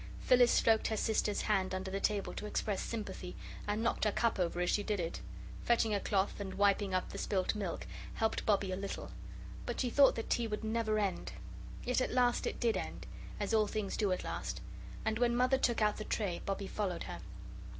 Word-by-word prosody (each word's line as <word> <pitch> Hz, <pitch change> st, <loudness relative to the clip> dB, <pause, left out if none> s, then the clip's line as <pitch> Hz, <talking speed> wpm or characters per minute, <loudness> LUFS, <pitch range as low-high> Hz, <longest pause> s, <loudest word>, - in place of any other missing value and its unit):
Phyllis 245 Hz, -1 st, +5 dB
stroked 225 Hz, -1 st, +4 dB
her 220 Hz, -, -1 dB
sister's 210 Hz, -1 st, +1 dB
hand 190 Hz, -3 st, +1 dB
under 190 Hz, 0 st, -4 dB
the 195 Hz, -, -1 dB
table 205 Hz, -1 st, 0 dB
to 210 Hz, -, -5 dB
express 205 Hz, -1 st, -1 dB
sympathy, 195 Hz, -5 st, -5 dB, 0.3 s
and 210 Hz, +2 st, 0 dB
knocked 235 Hz, -, +1 dB
her 210 Hz, -, +3 dB
cup 230 Hz, -1 st, +1 dB
over 175 Hz, -1 st, 0 dB
as 180 Hz, 0 st, +2 dB
she 205 Hz, -, +2 dB
did 205 Hz, -1 st, -1 dB
it. 165 Hz, -1 st, -3 dB, 0.4 s
Fetching 230 Hz, -2 st, +2 dB
a 200 Hz, -, +2 dB
cloth 195 Hz, 0 st, 0 dB
and 195 Hz, -2 st, -4 dB
wiping 200 Hz, 0 st, +3 dB
up 185 Hz, 0 st, -1 dB
the -, -, -5 dB
spilt 190 Hz, -2 st, 0 dB
milk 185 Hz, -, -3 dB, 0.3 s
helped 220 Hz, 0 st, 0 dB
Bobbie 200 Hz, -2 st, +2 dB
a -, -, 0 dB
little. 195 Hz, +1 st, -5 dB, 0.6 s
But -, -, -3 dB
she 250 Hz, -2 st, 0 dB
thought 280 Hz, +1 st, +6 dB
that 225 Hz, -, -4 dB
tea 235 Hz, -1 st, +2 dB
would 210 Hz, 0 st, -3 dB
never 220 Hz, -1 st, 0 dB
end. 200 Hz, -3 st, -1 dB, 0.5 s
Yet 250 Hz, +1 st, +2 dB
at -, -, +1 dB
last 245 Hz, -1 st, +2 dB
it -, -, -3 dB
did 230 Hz, -2 st, +2 dB
end, -, -, -5 dB, 0.3 s
as 205 Hz, +2 st, -1 dB
all 215 Hz, -1 st, +4 dB
things 205 Hz, -2 st, -2 dB
do 205 Hz, -3 st, +1 dB
at 185 Hz, -, -1 dB
last, -, -, -4 dB, 0.5 s
and 220 Hz, 0 st, 0 dB
when 240 Hz, -1 st, +3 dB
Mother 255 Hz, +2 st, +3 dB
took 235 Hz, -4 st, +2 dB
out 210 Hz, 0 st, +2 dB
the 215 Hz, -, -4 dB
tray, 200 Hz, -5 st, -1 dB
Bobbie 195 Hz, 0 st, -1 dB
followed 195 Hz, -3 st, -2 dB
her. -, -, -6 dB
210 Hz, 210 wpm, -34 LUFS, 195-225 Hz, 0.6 s, thought